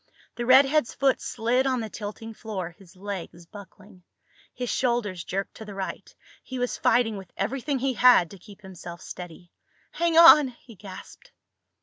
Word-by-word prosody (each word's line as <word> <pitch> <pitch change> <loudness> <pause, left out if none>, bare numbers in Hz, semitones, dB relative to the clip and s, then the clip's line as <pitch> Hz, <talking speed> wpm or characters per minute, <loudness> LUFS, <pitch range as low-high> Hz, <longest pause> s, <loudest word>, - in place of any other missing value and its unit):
The 240 0 -5
redhead's 270 +1 +4
foot 270 -2 +1
slid 250 +2 0
on 260 -1 0
the 225 - -4
tilting 215 +1 -8
floor, 195 -6 -6
his 190 -1 -18
legs 185 -3 -7
buckling. 200 0 -14 0.5
His 245 -1 -4
shoulders 235 -8 -1
jerked 195 +1 -4
to 220 - -9
the 205 -2 -9
right. 195 -1 -6 0.3
He 260 - -8
was 245 0 -2
fighting 225 -3 +2
with 190 -3 -11
everything 265 +7 -2
he 265 +1 -1
had 245 -9 +5
to 200 - -12
keep 205 +2 -15
himself 175 -3 -10
steady. 175 0 -10 0.4
"Hang 335 -1 0
on!" 330 -4 +9
he 240 -1 -14
gasped. 195 -2 -12
220 Hz, 160 wpm, -25 LUFS, 190-255 Hz, 0.5 s, on